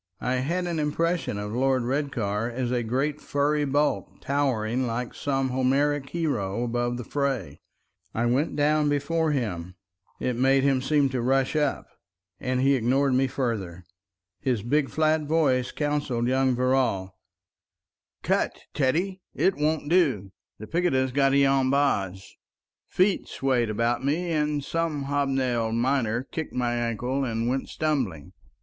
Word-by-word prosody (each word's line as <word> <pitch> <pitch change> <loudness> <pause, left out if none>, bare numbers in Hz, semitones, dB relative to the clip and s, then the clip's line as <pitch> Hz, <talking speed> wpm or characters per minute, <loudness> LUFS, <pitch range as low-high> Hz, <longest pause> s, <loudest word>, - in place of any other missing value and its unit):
I 125 +2 0
had 170 +8 -1
an 170 -2 -2
impression 165 -4 0
of 105 +1 -4
Lord 130 0 +1
Redcar 120 -5 -1
as 120 0 -3
a 125 -1 +1
great 135 +6 -1
furry 145 +1 +1
bulk, 145 +2 0
towering 130 -3 0
like 120 +1 -3
some 135 -2 -1
Homeric 135 +2 +1
hero 120 - -1
above 120 0 -1
the 125 - -5
fray. 130 - -2 0.5
I 115 - -1
went 130 +7 +1
down 150 0 +2
before 155 +3 0
him—it 90 - -5
made 135 +2 +3
him 135 -2 +2
seem 140 +1 +2
to 130 -2 -2
rush 135 +3 +1
up—and 125 - -3
he 135 +1 +4
ignored 130 +2 +2
me 135 +1 +3
further. 105 -10 -3 0.6
His 120 -6 -1
big 140 +3 +1
flat 155 +3 +2
voice 140 -5 +2
counseled 145 -5 -1
young 130 0 +2
Verrall— 125 -7 0 1.1
"Cut, - - 0
Teddy! 175 +8 0
It 190 - +2
won't 150 0 0
do. 140 - +2 0.3
The 110 - -8
picketa's 135 -5 +1
got 135 +1 +3
i'on 135 -1 +3
bahs... 100 -10 +1 0.4
." - - -68
Feet 190 +2 +3
swayed 125 -4 0
about 115 +4 0
me, 165 +5 0
and 150 -2 0
some 165 -2 -2
hobnailed 135 -5 0
miner 120 -1 +1
kicked 160 +3 -6
my 120 -1 0
ankle 120 +3 -1
and 115 -2 -1
went 130 +2 -1
stumbling. 125 - -2
130 Hz, 140 wpm, -26 LUFS, 120-145 Hz, 1.1 s, he